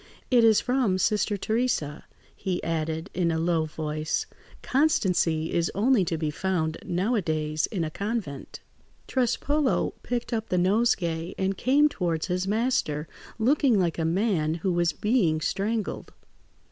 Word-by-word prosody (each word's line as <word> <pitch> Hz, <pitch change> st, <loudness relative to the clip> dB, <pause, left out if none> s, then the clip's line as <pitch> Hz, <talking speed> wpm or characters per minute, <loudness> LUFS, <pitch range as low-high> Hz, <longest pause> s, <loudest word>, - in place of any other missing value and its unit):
"It 245 Hz, -2 st, +5 dB
is 220 Hz, -2 st, +6 dB
from 250 Hz, -7 st, +1 dB
Sister 205 Hz, +1 st, +1 dB
Theresa," 220 Hz, -, -1 dB, 0.3 s
he 185 Hz, -3 st, -3 dB
added, 160 Hz, 0 st, -2 dB
in 175 Hz, -1 st, +1 dB
a 160 Hz, -, 0 dB
low 165 Hz, -1 st, +1 dB
voice; 155 Hz, 0 st, -2 dB, 0.4 s
"constancy 180 Hz, -, +1 dB
is 170 Hz, -1 st, +1 dB
only 220 Hz, +1 st, +3 dB
to 165 Hz, 0 st, -1 dB
be 155 Hz, -1 st, -2 dB
found, 160 Hz, -1 st, -1 dB
nowadays, 160 Hz, -6 st, 0 dB
in 190 Hz, -6 st, -2 dB
a 155 Hz, -, -3 dB
convent." 200 Hz, -, -4 dB, 0.5 s
Trespolo 265 Hz, +3 st, +1 dB
picked 245 Hz, 0 st, -3 dB
up 225 Hz, -1 st, -2 dB
the 180 Hz, -, +1 dB
nosegay 180 Hz, -4 st, +1 dB
and 190 Hz, 0 st, 0 dB
came 280 Hz, +8 st, +4 dB
towards 170 Hz, -, -2 dB
his 180 Hz, 0 st, -2 dB
master, 205 Hz, -, 0 dB, 0.3 s
looking 255 Hz, 0 st, +3 dB
like 170 Hz, -2 st, 0 dB
a -, -, 0 dB
man 165 Hz, -2 st, +1 dB
who 175 Hz, +2 st, -1 dB
was 175 Hz, -1 st, +2 dB
being 200 Hz, -6 st, +1 dB
strangled. 205 Hz, +5 st, -2 dB
185 Hz, 140 wpm, -26 LUFS, 160-230 Hz, 0.5 s, is